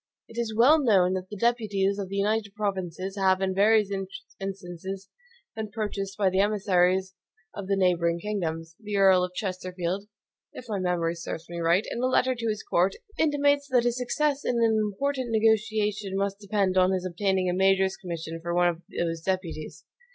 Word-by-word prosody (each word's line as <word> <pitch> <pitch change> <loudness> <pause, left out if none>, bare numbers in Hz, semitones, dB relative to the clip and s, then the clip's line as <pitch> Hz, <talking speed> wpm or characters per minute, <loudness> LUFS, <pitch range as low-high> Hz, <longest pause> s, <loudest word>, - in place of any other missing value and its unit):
It 230 - -7
is 220 -2 -4
well 270 +8 +6
known 190 -8 +4
that 185 0 -4
the 210 - -7
deputies 205 -3 +1
of 195 -2 -4
the 195 - -5
United 205 0 0
Provinces 190 -2 -3
have, 190 -1 +3
in 190 -1 0
various 210 +1 +4 0.5
instances, 190 0 -6 0.5
been 220 -1 -4
purchased 205 -3 -4
by 195 -3 +2
the 190 - +1
emissaries 190 -2 +2 0.4
of 200 -2 -7
the 200 - +2
neighboring 170 -3 +2
kingdoms. 165 -5 -4
The 210 -2 -3
Earl 190 -2 +5
of 180 0 -4
Chesterfield 185 0 -3 0.5
(if 255 - -9
my 210 -3 -2
memory 175 -2 0
serves 165 -1 -6
me 170 - -5
right), 170 +4 +2
in 235 - -3
a 255 - +2
letter 255 0 +2
to 230 -2 -4
his 215 -1 -3
court, 185 +3 +1 0.2
intimates 285 -2 +2
that 250 -3 +3
his 240 0 0
success 285 +3 0
in 245 - 0
an 225 -2 +3
important 255 +5 -2
negotiation 215 -2 +1
must 200 0 -1
depend 200 -2 +1
on 185 0 +4
his 185 -1 -2
obtaining 190 +1 0
a 180 - +1
major's 190 0 +3
commission 165 -2 -6
for 170 +1 -3
one 175 0 +4
of 170 -1 -5
those 165 -1 -2
deputies. 165 -4 -4
195 Hz, 180 wpm, -27 LUFS, 180-215 Hz, 0.5 s, well